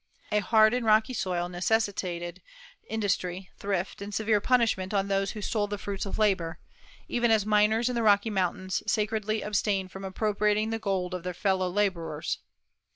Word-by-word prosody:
A 210 - +3
hard 215 +2 +4
and 250 0 0
rocky 220 +2 +3
soil 180 -6 -1
necessitated 180 -2 -1 0.5
industry, 190 -4 -2
thrift, 195 -1 -2
and 200 +1 -6
severe 215 0 +1
punishment 220 -5 +2
on 200 0 +1
those 195 0 0
who 210 - -6
stole 205 0 0
the 205 0 -4
fruits 200 0 -4
of - - -4
labor, 185 -7 +1 0.5
even 240 -1 +1
as 220 -2 +3
miners 215 +2 +3
in 250 - 0
the 235 - 0
Rocky 210 0 +4
Mountains 185 -1 -1
sacredly 215 0 0
abstain 205 -2 0
from 190 +2 -10
appropriating 210 +2 0
the 225 - -2
gold 190 -4 -1
of 180 - -3
their 180 0 -5
fellow 190 -1 +1
laborers. 170 -6 -1
205 Hz, 165 wpm, -28 LUFS, 185-215 Hz, 0.5 s, hard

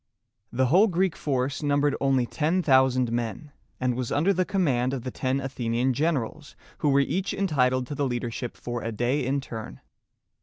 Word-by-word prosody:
The 130 +2 +1
whole 180 - +5
Greek 185 -2 0
force 135 0 -1
numbered 145 -1 +2
only 135 -2 +2
ten 160 +8 0
thousand 130 -4 +3
men, 120 +5 -3 0.3
and 125 -1 +1
was 125 -1 -3
under 175 +7 +2
the 185 0 +1
command 135 -10 +1
of 125 - -6
the 130 - -4
ten 130 +2 -1
Athenian 125 -1 -1
generals 150 0 -2 0.2
who 150 - +2
were 140 0 +4
each 190 +8 -1
entitled 130 -10 +1
to 145 - -6
the 140 -1 -1
leadership 120 -1 -4
for 120 -1 -4
a 115 - -3
day 120 +6 0
in 135 +2 0
turn. 110 - -8
135 Hz, 180 wpm, -26 LUFS, 125-150 Hz, 0.3 s, whole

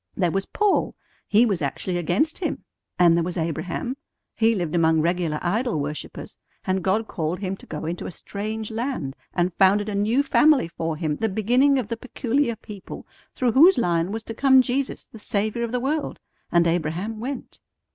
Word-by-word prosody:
There 180 -3 +2
was 195 +2 -1
Paul; 420 -2 +1 0.3
he 215 +3 +5
was 195 -7 0
actually 175 +6 -2
against 180 - 0
Him. 365 - -3 0.3
And 175 -2 +5
there 170 - +2
was 180 +1 -4
Abraham; 175 - -3 0.4
he 225 0 +3
lived 175 -5 -2
among 160 -2 +3
regular 170 -1 0
idol 210 - 0
worshippers, 150 +1 -6 0.3
and 190 -1 0
God 215 +4 +1
called 160 0 -2
him 190 -1 -3
to - - -16
go 150 - -5
into 170 +2 -4
a - - -4
strange 215 +4 -5
land 225 - -3 0.2
and 175 0 +1
founded 200 +3 +3
a - - -3
new 215 +7 +2
family 290 - +4
for 165 -1 -3
him, 155 -2 -1
the 225 - 0
beginning 245 +8 +3
of 250 -5 -1
the 230 +1 -3
peculiar 255 +1 -1
people 210 -3 -10 0.3
through 250 -2 +1
whose 325 +10 +7
line 175 -5 +1
was 220 +1 -4
to 225 - -6
come 265 +2 +5
Jesus, 265 +2 -2
the 225 - -13
Saviour 215 +3 -1
of 235 - -3
the 250 - 0
world. 290 +5 -2 0.3
And 170 0 +4
Abraham 175 +6 -1
went." 255 +3 -6
205 Hz, 185 wpm, -24 LUFS, 175-240 Hz, 0.4 s, whose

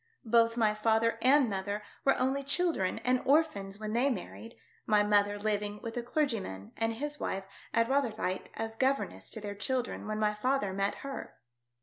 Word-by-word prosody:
Both 230 0 +4
my 215 -2 +3
father 225 +1 +2
and 270 +1 +5
mother 200 +1 -3 0.2
were 275 - +4
only 265 +2 +1
children 285 - +1
and 255 0 +3
orphans 230 -10 +1
when 215 0 -4
they 250 +4 +3
married, 230 0 -6 0.3
my 210 -1 +4
mother 205 0 +3
living 210 0 -1
with 225 -1 -5
a 240 - -1
clergyman 230 - -2
and 225 0 0
his 295 +5 -4
wife 190 0 -2 0.3
at 230 0 +2
Rotherhithe 225 -8 0
as 225 0 -4
governess 260 - 0
to - - -5
their 205 -1 -5
children 245 +3 -2
when 215 0 -2
my 210 -1 +2
father 210 -2 0
met 195 +1 0
her. 275 - -6
225 Hz, 175 wpm, -31 LUFS, 205-260 Hz, 0.3 s, and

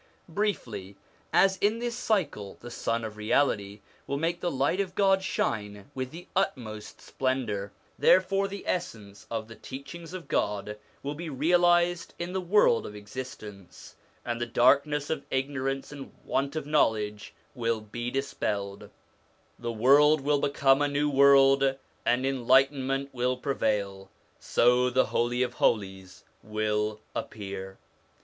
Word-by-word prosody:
Briefly, 120 - -3 0.4
as 190 0 +4
in 210 +3 +1
this 240 0 -3
cycle 175 - -1
the 120 - -10
Sun 115 0 -2
of 110 -1 -6
Reality 105 -3 0 0.3
will 140 - -1
make 170 +3 -1
the 175 - -1
light 140 +7 0
of 190 -2 -2
God 195 -1 +3
shine 105 - -3
with 130 -1 -4
the 170 +5 -10
utmost 120 - -2
splendour, 120 -7 -2 0.3
therefore 195 +1 +4
the 200 0 -8
essence 110 - -4
of 110 -2 -3
the 115 - -10
teachings 160 +6 -9
of 180 - -8
God 105 +1 -1 0.2
will 140 +1 -3
be 165 +2 -6
realised 175 +4 +2
in 175 +1 -5
the 190 - -1
world 180 - +3
of 105 - -9
existence, 105 -4 -9 0.3
and 120 -1 -3
the 120 - -1
darkness 140 +5 +3
of 160 - -2
ignorance 135 0 -2
and 140 -2 -9
want 140 +2 -1
of 155 -3 -3
knowledge 105 -8 0 0.2
will 115 -3 -1
be 120 +3 -5
dispelled; 105 -7 -3 0.7
the 120 -1 -3
world 140 +6 +5
will 145 +1 +2
become 140 -1 +3
a 145 - +3
new 145 +1 0
world, 135 -1 +5 0.3
and 125 +2 +2
enlightenment 135 +1 +2
will 125 0 0
prevail. 105 -7 -2 0.3
So 125 +1 +3
the 130 +1 +3
Holy 120 +1 0
of 125 -1 -3
Holies 95 -5 -1 0.2
will 105 0 -1
appear. 95 -2 -6
130 Hz, 140 wpm, -28 LUFS, 110-150 Hz, 0.7 s, world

